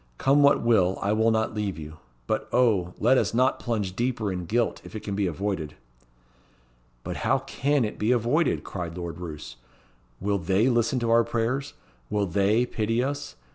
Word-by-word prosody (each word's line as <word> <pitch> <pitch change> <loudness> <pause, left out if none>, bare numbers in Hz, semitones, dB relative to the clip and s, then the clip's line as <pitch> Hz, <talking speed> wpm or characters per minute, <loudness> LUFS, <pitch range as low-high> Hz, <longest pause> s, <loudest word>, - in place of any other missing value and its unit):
Come 140 +2 +3
what 140 -3 +4
will, 95 -6 +3
I 100 +2 0
will 110 +1 +3
not 110 0 0
leave 105 -4 -3
you. 80 0 -9 0.3
But, - - -2
O! 105 -8 +2
let 125 +4 +4
us - - -1
not 130 +2 +2
plunge 105 -6 -2
deeper 115 -3 -1
in 90 -1 -4
guilt 120 +3 0
if - - -11
it 110 - -4
can 100 - -4
be 100 -1 0
avoided." 85 -3 -3 1.3
"But - - -5
how 135 - +2
can 135 0 0
it 105 - -6
be 110 +3 +1
avoided?" 125 +7 +1
cried 85 -2 -6
Lord 85 -1 -6
Roos. 75 -8 -8 0.6
"Will 100 +1 0
they 95 +8 +2
listen 120 +1 +1
to 115 -1 0
our 115 0 +5
prayers? 120 +5 -2 0.3
Will 105 -1 0
they 100 +6 +2
pity 115 +1 -1
us? 145 +2 -4
110 Hz, 180 wpm, -26 LUFS, 95-120 Hz, 1.3 s, our